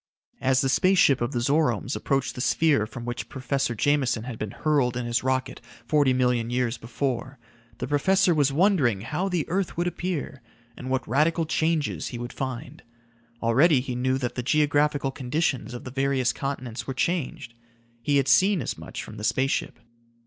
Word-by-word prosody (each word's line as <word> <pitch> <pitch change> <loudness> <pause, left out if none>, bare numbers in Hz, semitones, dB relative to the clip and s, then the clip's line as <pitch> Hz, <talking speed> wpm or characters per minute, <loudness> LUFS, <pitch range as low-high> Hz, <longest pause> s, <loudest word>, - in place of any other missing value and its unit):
As 130 -1 +3
the 135 - +1
space 185 +7 +3
ship 140 -7 +4
of 120 - -1
the - - -3
Zoromes 130 -3 +1
approached 135 -1 -1
the 125 - -6
sphere 140 -6 +2
from 120 +2 -8
which 120 0 -5
Professor 130 -1 -2
Jameson 130 -2 +1
had 125 -2 -7
been 110 - -3
hurled 130 -1 0
in 125 - -3
his 120 0 0
rocket 130 0 -1 0.2
forty 145 -3 +3
million 125 -2 +1
years 125 -1 0
before, 130 +2 -3 0.4
the - - -4
professor 185 +6 +3
was 145 -3 +2
wondering 145 - +2
how 185 - -2
the 175 -5 -1
earth 185 0 -2
would 175 - 0
appear, 175 -6 -3 0.3
and 130 - -7
what 130 -1 -1
radical 155 +6 +2
changes 160 -1 0
he 120 - -6
would 120 +1 -6
find. 130 +1 -5 0.6
Already 135 +6 +4
he 125 0 -4
knew 130 +2 0
that 125 -2 -3
the 125 - -3
geographical 145 0 +2
conditions 130 -3 -1
of 120 - -7
the 130 - -7
various 135 -1 +1
continents 130 -4 -5
were 135 - -4
changed. 155 -6 -2 0.5
He 145 +4 +2
had 135 -1 +2
seen 195 0 +4
as - - -4
much - - -7
from - - -10
the 105 - -7
space 130 +4 +1
ship. - - -2
135 Hz, 185 wpm, -25 LUFS, 125-150 Hz, 0.6 s, ship